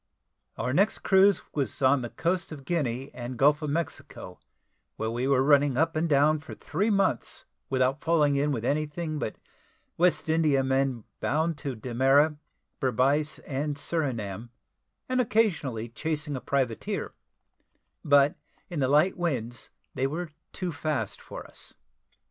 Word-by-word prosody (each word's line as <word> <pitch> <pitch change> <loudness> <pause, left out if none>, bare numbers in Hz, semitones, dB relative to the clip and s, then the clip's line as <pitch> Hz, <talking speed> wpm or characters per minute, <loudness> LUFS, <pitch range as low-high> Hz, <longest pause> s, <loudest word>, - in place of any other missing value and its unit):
Our 125 +2 -1
next 200 +8 +2
cruise 195 +1 +5
was 140 -3 -2
on 130 0 +4
the 120 - -4
coast 170 +5 -1
of 140 -3 -9
Guinea 135 -5 -2
and 120 0 -6
Gulf 145 +5 +4
of 150 - -2
Mexico 160 +1 -5 0.6
where 110 0 -2
we 120 +3 -1
were 135 -1 +3
running 145 -2 +4
up 165 +2 +2
and 160 +1 0
down 150 +2 +4
for 155 - -10
three 205 +4 -1
months, 195 -2 0 0.2
without 130 +1 +1
falling 150 -4 +3
in 145 +2 +1
with 120 -4 -2
anything 155 +2 -1
but 110 - -3 0.6
West 180 -1 +3
Indiamen 135 -6 +2 0.2
bound 160 +3 0
to 135 -3 -4
Demerara, 135 +6 +2 0.4
Berbice, 140 +3 +1
and 145 +1 -2
Surinam, 120 - -2 0.6
and 255 0 +2
occasionally 165 - 0
chasing 150 +4 -3
a 130 - -4
privateer; 130 -5 -2 0.9
but 145 -1 +5 0.4
in 170 - -3
the 130 - +2
light 150 +7 +3
winds 120 -9 -2 0.2
they 135 0 0
were 160 +3 -4 0.2
too 180 -2 -3
fast 155 -2 -3
for - - -9
us. - - -8
145 Hz, 145 wpm, -27 LUFS, 130-160 Hz, 0.9 s, cruise